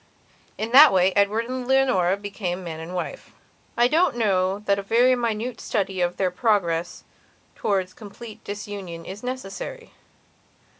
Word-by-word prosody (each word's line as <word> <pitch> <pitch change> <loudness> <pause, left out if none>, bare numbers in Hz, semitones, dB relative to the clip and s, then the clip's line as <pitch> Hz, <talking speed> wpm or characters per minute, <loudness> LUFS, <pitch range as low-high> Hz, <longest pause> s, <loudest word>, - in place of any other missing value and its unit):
In 220 +2 -3
that 285 +4 +9
way 185 0 +3
Edward 205 +3 +2
and 255 0 -5
Leonora 255 -9 +3
became 195 -3 -4
man 160 -2 -6
and 165 +3 -7
wife. 185 - -6 0.4
I 240 +1 +5
don't 320 0 +2
know 190 -4 +1
that 200 -1 +2
a - - -2
very 235 +6 +3
minute 235 0 -2
study 195 -3 -2
of 175 0 0
their 185 -2 +1
progress 175 -5 0 0.5
towards 190 -3 -1
complete 215 +1 -11
disunion 200 -5 -7
is 195 +3 -8
necessary. 255 - -6
205 Hz, 145 wpm, -24 LUFS, 185-240 Hz, 0.5 s, that